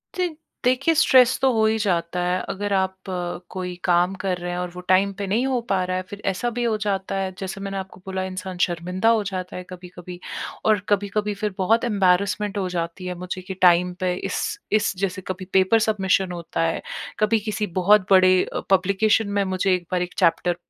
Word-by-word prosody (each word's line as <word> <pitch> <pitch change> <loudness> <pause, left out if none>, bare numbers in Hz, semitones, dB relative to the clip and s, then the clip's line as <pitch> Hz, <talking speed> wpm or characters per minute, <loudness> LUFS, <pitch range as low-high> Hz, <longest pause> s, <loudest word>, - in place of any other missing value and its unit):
जी, 365 -1 +1 0.4
देखिए 255 +6 +3
स्ट्रेस 260 -5 +5
तो 265 -1 +4
हो 220 -1 +3
ही 220 0 +2
जाता 180 -4 0
है 180 +1 +1
अगर 200 +1 -2
आप 190 -1 +1 0.5
कोई 180 -1 -5
काम 175 +1 +3
कर 185 -2 0
रहे 175 0 -5
हैं 175 - -3
और 180 0 -3
वो 180 +1 -8
टाइम 190 +2 +4
पे 200 - -3
नहीं 220 +7 +1
हो 260 -2 +1
पा 190 -2 +2
रहा 185 0 -1
है 185 - -3
फिर 205 0 -8
ऐसा 195 +6 -2
भी 240 +1 -3
हो 225 -2 +1
जाता 195 -1 -1
है 190 -1 -1
जैसे 195 0 -5
मैंने 195 0 -4
आपको 190 -1 -7
बोला 190 -1 -3
इंसान 185 0 -6
शर्मिंदा 180 +5 -1
हो 225 -2 +3
जाता 185 -2 -5
है, 180 - -5
कभी-कभी 180 -1 -10 0.5
और 215 -1 +4
कभी-कभी 205 +1 0
फिर 205 0 -3
बहुत 220 +5 +2
ऐम्बर्रेसमेंट 200 -1 +1
हो 190 -2 -1
जाती 175 +1 -4
है 180 - -3
मुझे 180 +1 -5
कि 185 +1 -6
टाइम 180 0 +5
पे 185 -1 0
इस, 425 - -3
इस 215 -1 +2
जैसे 190 0 -2
कभी 185 0 -4
पेपर 190 +4 +4
सबमिशन 190 -3 +1
होता 170 -1 -4
है 165 0 0 0.4
कभी 215 +1 +3
किसी 210 0 -3
बहुत 205 +1 +5
बड़े 185 -1 +6
अ, - - -4
पब्लिकेशन 200 +3 +3
में 200 - +3
मुझे 190 0 +1
एक 180 -1 -6
बार 180 -1 +1
एक 180 0 -4
चैप्टर 170 +1 +2
190 Hz, 210 wpm, -23 LUFS, 180-210 Hz, 0.5 s, बड़े